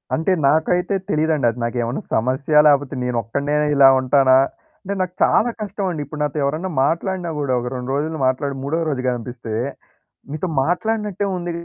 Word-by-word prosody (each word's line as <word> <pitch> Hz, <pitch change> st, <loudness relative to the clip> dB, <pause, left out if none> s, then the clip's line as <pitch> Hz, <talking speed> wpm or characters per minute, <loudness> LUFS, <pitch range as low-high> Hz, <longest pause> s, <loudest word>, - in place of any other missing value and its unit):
అంటే, 160 Hz, +4 st, 0 dB, 0.2 s
నాకైతే 180 Hz, +6 st, +1 dB
తెలీదండి. 155 Hz, -3 st, +1 dB
అది 120 Hz, -, -11 dB
నాకేమన్నా 120 Hz, +1 st, -2 dB
సమస్య? 130 Hz, +6 st, -1 dB
లేపోతే, 145 Hz, -2 st, +2 dB
నేనొక్కడినే 125 Hz, +4 st, -2 dB, 0.2 s
ఇలా 140 Hz, -1 st, +7 dB
ఉంటానా? 130 Hz, 0 st, +4 dB, 0.5 s
అంటే, 200 Hz, 0 st, -3 dB
నాకు 180 Hz, -1 st, -2 dB
చాలా 235 Hz, -, +3 dB
కష్టమండి. 190 Hz, -6 st, -3 dB
ఇప్పుడు 150 Hz, +2 st, -7 dB
నాతో 150 Hz, +1 st, -2 dB
ఎవరన్నా 155 Hz, +7 st, -1 dB
మాట్లాడినా 175 Hz, +3 st, -1 dB
గూడా 140 Hz, -3 st, -1 dB
ఒక 125 Hz, -, -4 dB
2 125 Hz, +1 st, -4 dB
రోజులు 155 Hz, +2 st, -2 dB
మాట్లాడి, 135 Hz, +2 st, -1 dB
మూడో 145 Hz, +4 st, -1 dB
రోజు 135 Hz, -4 st, -2 dB
గనిపిస్తే, 120 Hz, -2 st, -5 dB, 0.8 s
మీతో 155 Hz, +4 st, -3 dB, 0.2 s
మాట్లాడినట్టే 205 Hz, +4 st, -1 dB
ఉంది 175 Hz, 0 st, -4 dB
145 Hz, 150 wpm, -20 LUFS, 130-175 Hz, 0.8 s, ఇలా